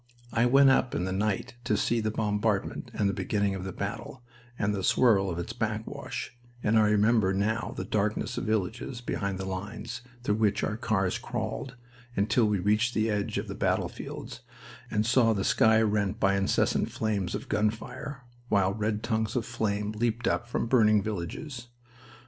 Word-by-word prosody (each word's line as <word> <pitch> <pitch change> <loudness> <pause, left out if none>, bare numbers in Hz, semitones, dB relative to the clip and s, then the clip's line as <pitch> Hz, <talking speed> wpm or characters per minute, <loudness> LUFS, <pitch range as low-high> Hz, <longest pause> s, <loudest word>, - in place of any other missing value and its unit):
I 115 +1 +3
went 135 +2 +6
up 130 -1 +2
in 90 - 0
the 95 - -2
night 100 +3 -1
to 105 -3 +1
see 120 +3 +1
the 110 -1 0
bombardment 105 -1 -1
and 100 - 0
the 100 - 0
beginning 100 -1 0
of 95 -1 -4
the 95 - -4
battle 105 +6 -5 0.3
and 105 0 0
the 100 - -2
swirl 100 -6 +4
of 85 - -3
its 85 +7 -4
backwash, 110 +1 -4 0.3
and 110 +1 +4
I 105 -1 +4
remember 105 -2 +3
now 110 +4 -1
the - - -3
darkness 105 0 -1
of - - -3
villages 110 +4 -2
behind 100 -5 -2
the 95 - -4
lines 105 +5 -5 0.2
through 105 -4 +1
which 110 -2 +1
our 105 - 0
cars 110 -5 0
crawled, 130 -1 -4 0.4
until 110 +4 +3
we 105 -1 +1
reached 105 +6 +1
the 110 0 +2
edge 105 -1 -1
of - - -3
the - - -4
battlefields - - -3 0.5
and 105 0 +1
saw 115 -1 +4
the 100 -2 -1
sky 110 +2 +4
rent 105 0 0
by 100 -1 +3
incessant 100 0 +1
flames 105 -5 -1
of - - -6
gun 105 +1 +2
fire, 125 +4 -7 0.3
while 95 -1 +3
red 105 0 -1
tongues 110 -1 -1
of 120 - 0
flames 105 -3 -2
leaped 115 +1 0
up 120 - 0
from 120 - -1
burning 110 -4 +4
villages. 110 - -5
105 Hz, 180 wpm, -28 LUFS, 100-115 Hz, 0.5 s, went